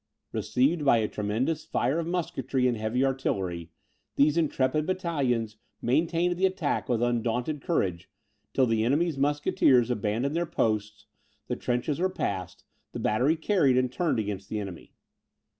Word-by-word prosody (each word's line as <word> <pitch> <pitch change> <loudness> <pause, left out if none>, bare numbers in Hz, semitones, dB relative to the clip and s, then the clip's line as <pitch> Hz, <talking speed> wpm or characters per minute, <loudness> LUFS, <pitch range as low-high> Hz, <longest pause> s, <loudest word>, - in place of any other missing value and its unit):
Received 145 +6 +1
by 135 -4 +5
a 110 -1 +1
tremendous 115 +11 -2
fire 150 -1 0
of 165 - -3
musketry 135 -7 -1
and 120 - +1
heavy 110 +4 0
artillery, 95 -11 -2 0.5
these 145 +2 +4
intrepid 155 -2 +1
battalions 140 - -1 0.2
maintained 170 +7 +1
the 190 +1 +4
attack 180 -7 -2
with 120 -1 +1
undaunted 120 +4 -1
courage, 95 - -1 0.4
till 130 - +3
the 115 -2 +1
enemy's 145 +4 +1
musketeers 140 -4 +3
abandoned 120 +6 -1
their 170 0 0
posts, 105 -4 -1 0.4
the - - -2
trenches 125 +5 -1
were 185 +1 +2
passed, 95 - -4 0.3
the - - -4
battery 125 +9 +2
carried 160 -6 +2
and 130 -1 +1
turned 170 +1 0
against 100 -2 -3
the 110 - -2
enemy. 95 -5 -8
130 Hz, 145 wpm, -27 LUFS, 110-155 Hz, 0.5 s, by